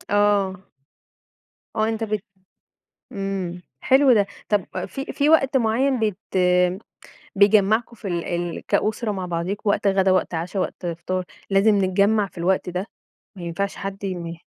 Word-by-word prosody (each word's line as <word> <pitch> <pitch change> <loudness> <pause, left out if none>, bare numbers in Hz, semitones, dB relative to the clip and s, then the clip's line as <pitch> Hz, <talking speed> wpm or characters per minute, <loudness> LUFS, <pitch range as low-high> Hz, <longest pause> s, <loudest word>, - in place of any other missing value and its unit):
آه. 205 -2 +3 1.2
آه، 215 0 +1
أنت 225 0 -2
بت 215 -2 -2 0.9
امم. 190 -3 -4 0.2
حلو 265 0 +5
ده، 205 -3 +4 0.2
طب 205 -3 +2 0.2
في 270 - -6
في 285 - +1
وقت 280 -3 +4
معيّن 255 +2 +2
بت 210 -4 0 1.2
بيجمعكم 215 +3 +3
في 205 -2 -6
ال 170 -2 -2
ال 175 -1 -3
كأسرة 215 +1 0
مع 190 -2 -4
بعضيكم، 180 +5 -2
وقت 205 - 0
غدا، 195 -1 +3
وقت 185 -1 +1
عشا، 175 +4 -3
وقت 180 - -4
فطار، 180 +2 -3 0.3
لازم 200 +2 +4
نتجمع 200 +2 +2
في 185 - -14
الوقت 185 +2 +1
ده؟ 180 +3 -3 0.5
ما 180 - -9
ينفعش 185 +4 -3
حد 195 0 -6
يم 175 -3 -4
195 Hz, 145 wpm, -23 LUFS, 185-215 Hz, 1.2 s, حلو